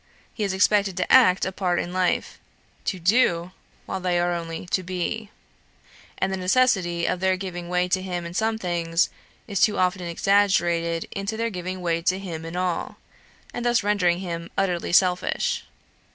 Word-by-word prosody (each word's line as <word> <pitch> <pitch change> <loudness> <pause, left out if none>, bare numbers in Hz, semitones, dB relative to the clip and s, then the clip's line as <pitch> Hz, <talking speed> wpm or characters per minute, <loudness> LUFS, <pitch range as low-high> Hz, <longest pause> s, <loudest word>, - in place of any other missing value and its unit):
He 215 - -3
is 200 - 0
expected 200 0 +2
to 185 - -1
act 230 -8 +6
a 190 - -2
part 185 -2 0
in 175 - -3
life; 185 -1 0 0.5
to 190 - -1
do, 175 -2 +2 0.3
while 190 - -4
they 180 -1 0
are 175 0 +1
only 165 0 -5
to 180 +1 0
be; 185 +4 -3 0.9
and 190 0 0
the - - -1
necessity 185 -4 +2
of 180 - 0
their 190 0 +2
giving 175 -2 -6
way 180 0 +1
to 185 +1 +1
him 180 -2 -4
in 170 - -7
some 220 +3 0
things, 170 -3 0 0.4
is 200 -4 -2
too 215 - +4
often 185 0 +1
exaggerated 170 -2 +1
into 200 +3 -3
their 230 0 -1
giving 185 0 -5
way 170 -1 0
to 185 +2 +1
him 170 -4 -6
in 165 +1 -6
all, 180 -2 -2 0.6
and 240 - -4
thus 240 -3 +2
rendering 185 -4 +2
him 170 -2 -5
utterly 180 -3 0
selfish. 180 0 +2
185 Hz, 175 wpm, -24 LUFS, 175-195 Hz, 0.9 s, act